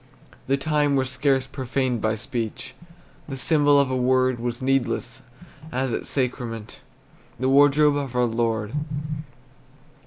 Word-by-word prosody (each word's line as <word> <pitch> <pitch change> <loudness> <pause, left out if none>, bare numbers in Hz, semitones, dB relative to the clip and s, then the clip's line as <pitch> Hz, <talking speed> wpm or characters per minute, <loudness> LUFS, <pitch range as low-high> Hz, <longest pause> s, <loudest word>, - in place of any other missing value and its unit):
The 135 +1 +2
time 145 0 +1
was 130 -1 0
scarce 130 0 +1
profaned 130 -2 -2
by 110 0 +1
speech; 115 -1 -5 0.6
The 135 - -5
symbol 145 +1 +4
of 140 -2 +1
a - - 0
word 130 0 +2
Was 120 0 -3
needless, 130 -3 -1 0.5
as 130 -1 -1
at - - -3
sacrament 120 -4 -3 0.6
The 130 +1 +1
wardrobe 145 +1 +5
of 135 -3 -4
our 125 0 +3
Lord. 115 -2 -1
130 Hz, 130 wpm, -24 LUFS, 120-140 Hz, 0.6 s, wardrobe